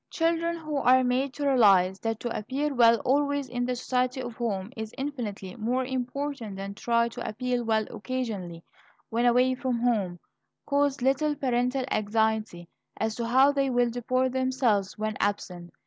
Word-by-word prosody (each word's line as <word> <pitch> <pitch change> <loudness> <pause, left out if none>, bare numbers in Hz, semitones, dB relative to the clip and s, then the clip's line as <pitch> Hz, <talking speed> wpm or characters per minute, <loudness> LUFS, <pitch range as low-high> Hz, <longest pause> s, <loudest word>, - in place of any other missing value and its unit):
Children 335 +1 0
who 310 -3 -4
are 260 -1 +5
made 255 +2 0
to 290 - -3
realize 195 -8 +4
that 225 -1 -2
to 240 -1 -3
appear 275 +7 -2
well 235 -2 +6
always 285 +1 +1
in 245 0 -2
the 250 - -1
society 250 +1 -1
of 245 -2 -5
home 210 -3 -3
is 220 0 -6
infinitely 240 -9 -5
more 245 +4 0
important 260 -3 -4
than 195 +1 -6
to - - -15
try 235 0 +3
to - - -6
appear 245 +2 -2
well 220 -1 +1
occasionally 210 -8 -5 0.5
when 235 +2 +2
away 250 +2 +4
from 255 -1 -2
home, 205 -8 0 0.5
cause 285 -2 +1
little 290 +3 +2
parental 255 -1 0
anxiety 215 -4 0 0.3
as 220 0 -1
to 230 +1 -3
how 265 +4 +5
they 275 -1 0
will 245 -1 +2
deport 255 +2 0
themselves 255 -6 0
when 215 0 -2
absent. 180 -4 -2
245 Hz, 165 wpm, -27 LUFS, 220-260 Hz, 0.5 s, well